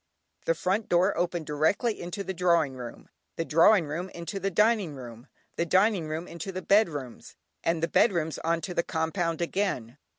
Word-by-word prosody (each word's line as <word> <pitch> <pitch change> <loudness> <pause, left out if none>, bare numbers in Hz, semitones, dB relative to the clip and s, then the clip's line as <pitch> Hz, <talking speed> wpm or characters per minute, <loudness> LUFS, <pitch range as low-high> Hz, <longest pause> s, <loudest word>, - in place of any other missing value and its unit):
The - - +3
front 200 - -1
door 180 +3 +3
opened 175 -2 -1
directly 160 - 0
into 175 +3 -5
the 190 - -4
drawing 170 -5 +2
room, 125 -2 -9 0.3
the 165 - -2
drawing 170 +4 +5
room 165 +6 -4
into 175 +3 -6
the 195 +1 -1
dining 210 -4 +2
room, 120 -2 -10 0.3
the 170 - +1
dining 190 -2 +3
room 160 +3 -4
into 170 +3 -6
the 185 0 -6
bedrooms, 155 - 0 0.3
and 165 0 0
the - - +3
bedrooms 170 -8 +2
on 165 0 0
to 180 - -5
the 170 - +2
compound 165 0 -2
again. 150 - -2
170 Hz, 175 wpm, -28 LUFS, 160-195 Hz, 0.3 s, drawing